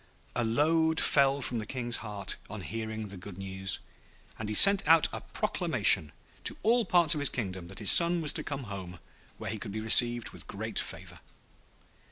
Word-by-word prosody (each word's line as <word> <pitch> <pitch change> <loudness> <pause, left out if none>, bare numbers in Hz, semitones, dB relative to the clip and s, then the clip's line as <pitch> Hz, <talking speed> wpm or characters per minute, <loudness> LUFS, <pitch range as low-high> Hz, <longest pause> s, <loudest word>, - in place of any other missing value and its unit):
A 120 - -1
load 160 +7 0
fell 140 0 +1
from 120 -1 -3
the 110 - -6
King's 120 -2 -4
heart 105 -3 -5
on 105 -1 -8
hearing 110 +2 -6
the 100 - -7
good 90 0 -11
news, 95 -1 -4 0.6
and 110 -2 -6
he 105 - -3
sent 200 - +8
out 165 0 +4
a - - -6
proclamation 75 - +3 0.3
to - - -4
all 235 +1 +1
parts 170 -3 +3
of 150 - -4
his 145 - +1
kingdom 95 -7 -6
that 95 - -14
his 105 - +5
son 170 0 +5
was 155 -3 -2
to - - -5
come 140 -2 -6
home, 95 -5 -9 0.4
where 110 -1 -6
he 110 - -6
would 100 - -7
be 110 - -6
received 120 +1 +3
with - - -8
great - - -5
favour. - - -7
115 Hz, 195 wpm, -28 LUFS, 100-150 Hz, 0.6 s, sent